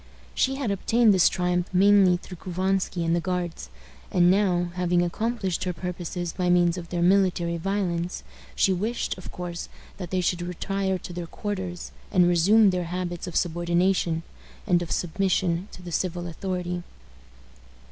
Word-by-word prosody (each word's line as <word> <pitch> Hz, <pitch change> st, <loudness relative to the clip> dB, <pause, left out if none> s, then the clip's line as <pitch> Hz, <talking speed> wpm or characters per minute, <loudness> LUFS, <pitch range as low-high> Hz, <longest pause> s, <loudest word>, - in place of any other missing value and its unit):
She 265 Hz, 0 st, +1 dB
had 265 Hz, -6 st, -2 dB
obtained 225 Hz, +3 st, +3 dB
this 185 Hz, -3 st, +5 dB
triumph 180 Hz, 0 st, 0 dB
mainly 190 Hz, -1 st, +5 dB
through 180 Hz, 0 st, -11 dB
Couvansky 185 Hz, 0 st, -1 dB
and 165 Hz, +1 st, +2 dB
the -, -, +1 dB
Guards; 175 Hz, -, -3 dB, 0.4 s
and 175 Hz, 0 st, +4 dB
now, 180 Hz, -3 st, +2 dB
having 180 Hz, -1 st, +1 dB
accomplished 195 Hz, 0 st, -2 dB
her 180 Hz, -, -1 dB
purposes 175 Hz, -1 st, -4 dB
by 180 Hz, -1 st, -1 dB
means 175 Hz, -1 st, +4 dB
of 170 Hz, -2 st, -7 dB
their 175 Hz, -1 st, -1 dB
military 180 Hz, -2 st, +2 dB
violence, 180 Hz, -1 st, -2 dB, 0.3 s
she 190 Hz, -, +3 dB
wished, 215 Hz, +6 st, -2 dB
of 185 Hz, -, -9 dB
course, 175 Hz, -1 st, -6 dB, 0.3 s
that 180 Hz, -3 st, -6 dB
they 185 Hz, -, 0 dB
should 180 Hz, 0 st, 0 dB
retire 190 Hz, +2 st, -2 dB
to 180 Hz, -, -9 dB
their 175 Hz, -1 st, -5 dB
quarters, 185 Hz, -2 st, -5 dB, 0.2 s
and 180 Hz, -1 st, +4 dB
resume 195 Hz, +5 st, +5 dB
their 180 Hz, -1 st, -1 dB
habits 175 Hz, 0 st, -4 dB
of 175 Hz, -, -7 dB
subordination, 175 Hz, 0 st, +1 dB, 0.4 s
and 175 Hz, -1 st, +3 dB
of 170 Hz, -, -5 dB
submission 180 Hz, 0 st, 0 dB
to 180 Hz, -, -12 dB
the 175 Hz, -, -7 dB
civil 175 Hz, 0 st, -2 dB
authority. 180 Hz, +1 st, -3 dB
180 Hz, 155 wpm, -25 LUFS, 175-190 Hz, 0.4 s, this